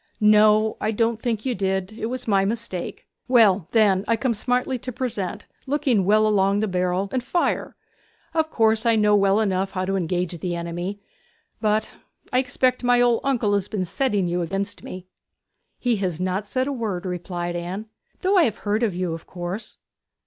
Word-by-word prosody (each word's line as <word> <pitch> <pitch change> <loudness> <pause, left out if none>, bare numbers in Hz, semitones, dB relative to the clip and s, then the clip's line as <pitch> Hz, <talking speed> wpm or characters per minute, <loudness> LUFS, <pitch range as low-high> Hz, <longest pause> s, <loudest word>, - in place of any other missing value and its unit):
'No, 215 0 +5
I 215 - 0
don't 225 +1 0
think 230 -3 -2
you 255 - +1
did; 190 -1 -1
it 220 0 -4
was 250 +1 -5
my 195 -3 +3
mistake. 210 -3 -4 0.2
Well, 210 -8 +4
then 200 -4 +3
I 230 - +3
come 235 +1 0
smartly 250 +3 -1
to 255 - -6
Present, 215 -5 -3 0.2
looking 265 - +1
well 215 +2 +4
along 200 -1 +2
the 215 - 0
barrel 180 -1 0
along - - -2
the - - -1
barrel - - -7
and - - -20
fire. 345 +7 -1 0.6
Of 320 -1 +1
course 220 -4 +2
I 230 -2 +3
know 210 -1 +4
well 200 0 +3
enough 195 -3 0
how 185 -1 -1
to 195 +1 -1
engage 180 -1 -1
the 175 +1 -2
enemy! 175 +4 -4 0.6
But 215 0 +1 0.4
I 250 - +4
expect 255 0 0
my 245 0 +4
old 240 -1 +4
uncle 240 -7 +1
has 200 -2 0
been 195 -4 -2
setting 205 -1 0
you 175 +1 -1
against 195 +4 -3
me.' 185 0 -8 0.7
'He 245 -3 0
has 180 -4 -2
not 185 +3 -2
said 255 +5 0
a 285 - -2
word,' 210 -8 -3
replied 175 -1 -4
Anne; 180 +5 -4 0.4
'though 385 +1 +3
I 335 - +6
have 220 -4 -2
heard 210 +2 +1
of 215 -7 0
you, 180 -2 -2
of 165 - -8
course.' 180 +4 -6
210 Hz, 195 wpm, -23 LUFS, 185-235 Hz, 0.7 s, I